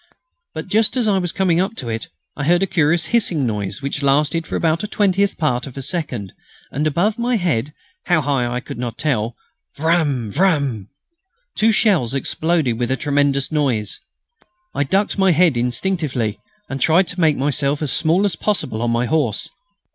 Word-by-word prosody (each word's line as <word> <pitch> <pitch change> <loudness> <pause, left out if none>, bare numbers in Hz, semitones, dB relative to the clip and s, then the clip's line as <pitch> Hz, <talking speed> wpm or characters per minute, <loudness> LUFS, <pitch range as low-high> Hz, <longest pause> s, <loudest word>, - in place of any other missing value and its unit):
But 160 - -4
just 220 +5 +2
as 240 -3 +1
I 195 -2 +3
was 175 -2 -1
coming 180 -3 +2
up 195 +4 -2
to 125 - -6
it 115 -1 -4 0.3
I 145 - -3
heard 175 +4 +3
a - - +4
curious 165 -1 +1
hissing 175 - +2
noise 105 0 -3
which 140 +1 -3
lasted 150 +4 +1
about 165 0 +1
the 210 - -4
twentieth 200 -1 +1
part 130 -5 0
of 135 - -11
a 135 - -4
second, 125 - -3 0.4
and, 150 +3 0
above 190 +9 0
my 245 +1 +1
head 150 - 0 0.3
how 175 -3 +3
high 135 -4 0
I 125 +1 -3
could 120 - -8
not 120 -2 -3
quite - - -7
tell 120 -6 0 0.4
vrran!... 145 -8 +1
vrran! 140 - +1 0.7
two 225 +1 +3
shells 185 - +2
exploded 150 -3 0
with 120 -1 -1
a 130 - 0
tremendous 145 -1 +1
noise. 130 -9 -1 0.7
I 145 - 0
ducked 195 +7 0
my 190 0 +4
head 165 -3 +4
instinctively 125 - -1 0.3
and 135 0 -5
tried 170 +6 +4
to 180 0 -3
make 155 -3 +3
myself 140 +1 0
as 145 - 0
small 170 +5 +2
as 195 -5 0
possible 155 - -2
on 120 - 0
my 115 +1 +1
horse. 125 -5 0
150 Hz, 185 wpm, -20 LUFS, 125-180 Hz, 0.7 s, a